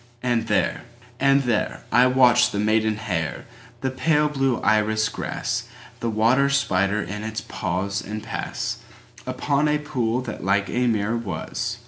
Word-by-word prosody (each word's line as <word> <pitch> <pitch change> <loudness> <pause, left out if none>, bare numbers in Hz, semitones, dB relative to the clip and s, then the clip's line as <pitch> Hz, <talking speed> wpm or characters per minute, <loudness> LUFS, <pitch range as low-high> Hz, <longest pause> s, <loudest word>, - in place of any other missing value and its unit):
And 120 -2 0
there—and 120 +7 0
there—I 120 +1 +2
watched 125 -1 +5
the - - -3
maiden 110 +1 +2
hair, 90 -8 -3 0.4
The 130 - -1
pale 150 +3 +2
blue 135 -4 0
iris 110 0 +2
grass, - - -3 0.3
The 115 - -1
water 115 +6 +3
spider 105 -7 +1
in 105 +4 -6
its 110 0 -4
pause 95 +2 -3
and 105 +1 -6
passUpon 145 +1 -3
a 150 - +2
pool 125 -5 -1
that 120 -7 -6
like 100 +1 +1
a 125 +1 +1
mirror 110 0 +1
was. 100 -9 -4
115 Hz, 135 wpm, -23 LUFS, 105-130 Hz, 0.4 s, watched